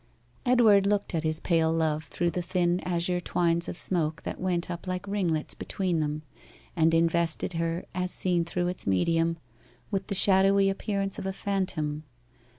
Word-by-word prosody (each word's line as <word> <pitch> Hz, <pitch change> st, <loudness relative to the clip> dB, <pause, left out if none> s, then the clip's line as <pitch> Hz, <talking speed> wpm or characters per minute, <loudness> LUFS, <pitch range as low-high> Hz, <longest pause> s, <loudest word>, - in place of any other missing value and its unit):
Edward 220 Hz, -5 st, +5 dB
looked 205 Hz, -1 st, 0 dB
at 165 Hz, -, 0 dB
his 155 Hz, 0 st, 0 dB
pale 165 Hz, -2 st, +1 dB
love 160 Hz, -1 st, 0 dB
through 175 Hz, -1 st, -2 dB
the 180 Hz, -, -2 dB
thin 175 Hz, 0 st, 0 dB
azure 180 Hz, 0 st, -1 dB
twines 170 Hz, -1 st, +1 dB
of -, -, -6 dB
smoke 160 Hz, -5 st, 0 dB
that -, -, -6 dB
went 180 Hz, -1 st, -1 dB
up 175 Hz, +2 st, -7 dB
like 185 Hz, +2 st, -4 dB
ringlets 180 Hz, -6 st, -1 dB
between 180 Hz, -4 st, -2 dB
them, 150 Hz, 0 st, -2 dB, 0.5 s
and 165 Hz, -1 st, +3 dB
invested 165 Hz, +1 st, +1 dB
her, 165 Hz, +1 st, -2 dB
as 180 Hz, 0 st, -2 dB
seen 180 Hz, -2 st, +1 dB
through 175 Hz, +1 st, -2 dB
its 180 Hz, -, -3 dB
medium, 165 Hz, -, +1 dB, 0.5 s
with 195 Hz, -2 st, -2 dB
the 200 Hz, -, +1 dB
shadowy 195 Hz, 0 st, +5 dB
appearance 195 Hz, 0 st, -2 dB
of 190 Hz, -, -4 dB
a -, -, -1 dB
phantom. 175 Hz, -7 st, -2 dB
175 Hz, 165 wpm, -27 LUFS, 165-190 Hz, 0.5 s, Edward